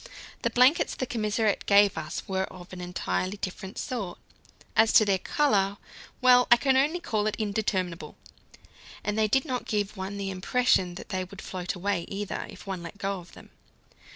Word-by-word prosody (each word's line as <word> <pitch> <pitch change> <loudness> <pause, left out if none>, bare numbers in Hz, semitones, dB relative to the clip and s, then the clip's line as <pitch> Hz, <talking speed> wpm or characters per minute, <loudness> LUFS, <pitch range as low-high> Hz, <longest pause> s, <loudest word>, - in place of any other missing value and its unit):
The - - +1
blankets 255 +6 +4
the 255 - -2
commissariat 215 -2 0
gave 200 -1 +6
us 155 - -5
were 190 0 0
of 185 0 -12
an 180 - -7
entirely 180 - -2
different 190 +1 -6
sort. 205 -9 -4 0.6
As 225 0 +5
to 225 -6 +7
their 195 -2 +2
colour 200 -7 +1 0.4
well, 250 -1 +6
I 240 - +8
can 265 +2 +2
only 295 +6 +2
call 215 -10 -1
it 215 - -1
indeterminable 200 -5 -2 0.9
and 210 - -1
they 220 0 +2
did 265 +8 +2
not 255 -4 -3
give 210 -1 -1
one 195 +1 -5
the 195 -1 -3
impression 185 -2 +1
that - - -9
they 185 -3 -1
would 190 +2 -11
float 180 0 -4
away 190 -1 -1
either, 200 0 -4
if - - -12
one 190 -3 -4
let 170 +4 -9
go 195 -1 -2
of 175 0 -15
them. - - -15
200 Hz, 180 wpm, -27 LUFS, 185-225 Hz, 0.9 s, I